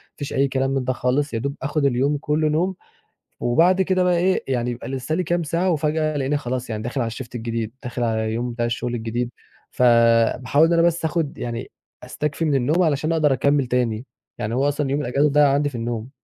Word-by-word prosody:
مفيش 145 - -6
أي 140 0 +2
كلام 135 0 -1
من 135 -1 0
ده 130 +1 0
خالص، 130 +3 0
يا 115 - -1
دوب 140 +4 -3
آخد 145 +2 -1
اليوم 140 +3 +2
كله 150 +1 0
نوم 175 +5 0 0.6
وبعد 170 +10 +3
كده 185 -1 +2
بقى 180 -1 +2
إيه، 185 +2 +1
يعني 125 -2 -1
يبقى 120 - -7
لسّه 135 +3 -2
لي 185 - 0
كام 175 0 0
ساعة 170 +4 0
وفجأة 155 -1 0
ألاقيني 140 +1 0
خلاص 125 -2 -4
يعني 110 -1 -4
داخل 125 +3 -2
على 115 - -1
الShift 120 +2 -7
الجديد، 115 -1 -3
داخل 125 -1 -3
على 110 -1 0
اليوم 115 +3 -2
بتاع 120 0 -2
الشغل 120 +1 -2
الجديد. 120 +1 -2 0.4
فباحاول 120 +4 +4
إن 170 - +1
أنا 170 - +4
بس 170 -1 +1
آخد 160 -2 -1
يعني 120 -1 -5 0.3
أستكفي 150 +2 -3
من 150 -3 +1
النوم 145 +7 +2
علشان 155 0 +1
أقدر 155 -4 +3
أكمّل 140 +2 +2
تاني، 120 -2 -1 0.3
يعني 110 +2 -3
هو 135 +3 +2
أصلًا 145 -1 -1
يوم 145 +2 0
الأجازة 140 +3 +1
ضايع 145 0 +5
عندي 145 +1 +1
في 135 - -10
النوم. 115 0 -4
135 Hz, 215 wpm, -22 LUFS, 120-155 Hz, 0.6 s, ضايع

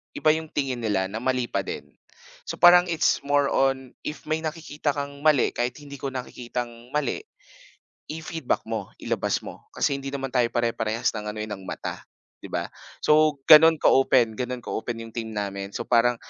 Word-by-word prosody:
iba 155 - +2
'yung 160 0 -2
tingin 135 -5 -2
nila 100 -4 -1
na 110 - -3
mali 125 0 0
pa 100 - +1
din. 75 -6 -6 0.6
So - - -3
parang 175 +1 +8
it's 165 -2 +2
more 145 0 +2
on 135 -1 +1 0.2
if 150 - -6
may 155 +1 -1
nakikita 155 -2 -3
kang 140 0 -5
mali 150 -3 +3
kahit 120 0 -2
hindi 140 -2 -10
ko 140 - -3
nakikitang 120 -2 -6
mali 150 - 0 0.9
i-feedback 160 -3 -3
mo, 110 -3 -4 0.2
ilabas - - -1
mo. - - -10
Kasi - - +1
hindi 135 - -7
naman 135 -2 -4
tayo 125 -2 +3
pare 120 -1 +1
parehas 110 +1 -1
ng 105 -1 -6
ano 105 +1 -5
eh, 110 - -7
ng 100 - -5
mata, - - -6 0.3
'di - - -9
ba? - - -3 0.3
So, 150 -2 +4
gano'n 160 +1 +9
ka-open 130 -3 +4
gano' 125 -1 -3
ka-open 115 0 -4
'yong 115 - -10
team 110 -2 -4
namin 100 -1 -4
so - - -2
parang, 120 0 +3
130 Hz, 185 wpm, -25 LUFS, 115-150 Hz, 0.9 s, gano'n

